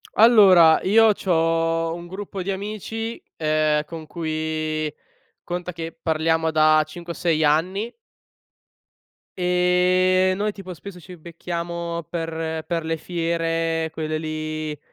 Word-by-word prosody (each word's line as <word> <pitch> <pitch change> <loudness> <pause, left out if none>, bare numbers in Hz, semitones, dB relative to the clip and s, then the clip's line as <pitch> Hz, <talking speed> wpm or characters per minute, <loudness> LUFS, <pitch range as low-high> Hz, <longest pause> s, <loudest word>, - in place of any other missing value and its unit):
Allora, 195 -8 +7
io 220 +3 +5
c’ho 165 -2 0
un 175 0 -8
gruppo 190 +1 -6
di 195 - -2
amici, 215 +3 -5 0.2
ehm, 155 -1 +1
con 160 0 -8
cui 155 -1 -3 0.5
conta 180 0 -4
che 165 0 -6
parliamo 160 0 0
da 155 0 +4
5 170 +2 -8
o - - -14
6 160 -2 +1
anni 185 +9 +1 1.5
ehm, 180 +1 +3
noi 210 +1 0
tipo 185 -3 -9
spesso 180 +1 -10
ci 180 0 -12
becchiamo 170 0 -5
per 165 -1 -4
per 165 -2 -2
le 165 0 -1
fiere, 165 -1 -1
quelle 155 -1 -3
lì 155 -1 -4
165 Hz, 120 wpm, -23 LUFS, 160-180 Hz, 1.5 s, Allora